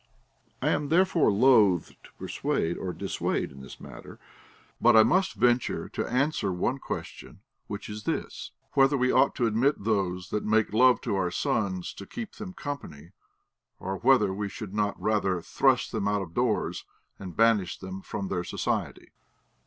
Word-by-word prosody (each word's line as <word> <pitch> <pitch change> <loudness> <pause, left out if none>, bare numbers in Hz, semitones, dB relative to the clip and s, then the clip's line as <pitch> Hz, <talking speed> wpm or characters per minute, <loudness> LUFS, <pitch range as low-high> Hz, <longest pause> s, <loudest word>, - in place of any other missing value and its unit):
I - - +2
am 145 -1 0
therefore 170 - +3
loath 105 -6 +4
to - - -19
persuade 85 +1 -2
or 95 - -4
dissuade - - -2
in 65 0 -12
the 65 - -10
matter. - - -11 0.6
But 120 0 +6
I 110 - +9
must 185 - +2
venture 120 0 +1
to - - -3
answer 125 -5 0
one 105 +9 -1
question, - - -7 0.3
which 100 -1 -6
is 105 0 -8
this: - - -3 0.2
whether 135 +1 +4
we 125 0 +2
ought 140 - +3
to 120 - +1
ad.mit 115 +3 +1
those 95 -4 -1
that 105 - -1
make 110 0 +1
love 125 +3 +5
to 115 -6 -2
our 90 -2 0
sons 95 0 -2
to 100 - -10
keep 230 -4 -7
them 205 -4 -7
company, 90 - -7 0.7
or 95 0 -4
whether 120 -5 +4
Ave 100 +1 -3
should 100 -1 -8
not 105 -1 -1
rather 100 -4 0
thrust - - +1
them 100 - -1
out 105 -1 0
of 85 -3 -11
doors, 120 0 -1 0.4
and 90 -3 -9
banish 110 -5 +3
them 95 0 -7
from 100 0 -5
their 90 -2 -2
society. - - -3
105 Hz, 170 wpm, -27 LUFS, 95-125 Hz, 0.7 s, I